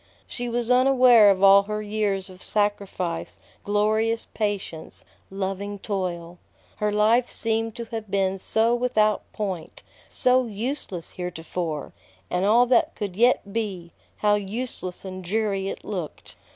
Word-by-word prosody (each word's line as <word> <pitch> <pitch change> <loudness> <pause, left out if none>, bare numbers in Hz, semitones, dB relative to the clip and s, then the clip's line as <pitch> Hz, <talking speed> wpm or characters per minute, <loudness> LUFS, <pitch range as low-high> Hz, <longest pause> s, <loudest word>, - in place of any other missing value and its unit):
She 245 -1 -5
was 240 0 -1
unaware 250 -4 +6
of 195 -1 +2
all 195 0 +8
her 210 0 -2
years 205 -2 -1
of 185 -1 -14
sacrifice, 200 -5 -2 0.3
glorious 215 +2 +1
patience, 200 -7 -4 0.2
loving 195 +1 -4
toil. 180 -4 -4 0.4
Her 210 0 0
life 220 +4 +3
seemed 225 -1 0
to 235 -1 -5
have 225 -2 -6
been 195 -1 0
so 225 +4 +2
without 220 -4 +1
point, 190 -6 -5 0.3
so 255 0 +3
useless 215 - -4
heretofore; 170 -3 -5 0.4
and 180 +2 +1
all 235 +4 +5
that 245 -1 +2
could 200 -4 -4
yet 225 -3 +2
be, 190 -7 -3 0.3
how 210 -1 +2
useless 205 -2 -3
and 185 0 -7
dreary 195 0 -1
it - - -6
looked! 180 -7 -6
205 Hz, 135 wpm, -24 LUFS, 190-225 Hz, 0.4 s, all